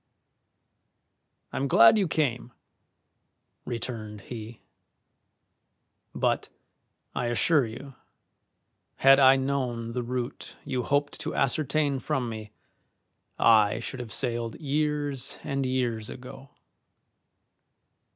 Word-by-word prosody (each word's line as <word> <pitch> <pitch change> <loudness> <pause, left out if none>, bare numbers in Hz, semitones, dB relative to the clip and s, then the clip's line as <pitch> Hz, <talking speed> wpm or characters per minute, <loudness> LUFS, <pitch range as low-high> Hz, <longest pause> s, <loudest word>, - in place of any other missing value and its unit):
"I'm 140 - -1
glad 115 - +7
you 200 -4 +2
came," 125 -7 -1 1.1
returned 110 -3 -5
he; 115 0 -9 1.5
"but, - - 0 0.6
I 120 - -1
assure 120 +4 +2
you, 135 +5 -9 1.0
had 135 +1 +6
I 135 -1 +7
known 130 -4 -2
the 125 +1 -2
route 125 0 -5
you 130 -1 -1
hoped 145 +3 0
to - - -4
ascertain 145 +1 +1
from 130 -2 -2
me 110 -2 -7 0.9
I 110 -3 +5
should 130 - -6
have 120 -3 -7
sailed 120 -1 -2
years 145 -2 -1
and 140 -2 -1
years 120 -4 -1
ago. 130 +1 -10
125 Hz, 95 wpm, -27 LUFS, 115-140 Hz, 1.5 s, glad